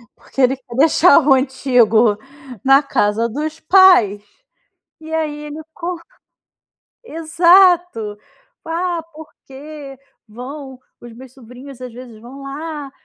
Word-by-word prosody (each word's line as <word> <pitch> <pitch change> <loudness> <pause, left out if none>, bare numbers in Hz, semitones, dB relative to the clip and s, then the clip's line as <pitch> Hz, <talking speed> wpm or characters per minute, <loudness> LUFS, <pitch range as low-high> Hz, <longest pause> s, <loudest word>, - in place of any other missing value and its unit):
Porque 270 - -6
ele 260 +1 +3
quer 250 -2 -13
deixar 320 +2 +5
o 285 -3 +3
antigo 245 -5 +2 0.5
na 270 +1 +5
casa 225 -4 0
dos 305 +6 -5
pais 330 - +4 0.8
e 320 0 -10
aí 300 -2 -3
ele 300 +1 -8
co 350 +1 -5 1.1
exato. 340 - +2 0.5
"Ah, 340 +1 -3
porque 295 -2 -12 0.3
vão 260 +4 -10 0.2
os 240 -1 -12
meus 255 +2 -14
sobrinhos 255 +2 -13
às 250 -2 -8
vezes 240 -3 -12
vão 265 +4 -12
lá. 290 0 -7
275 Hz, 115 wpm, -17 LUFS, 250-315 Hz, 1.1 s, deixar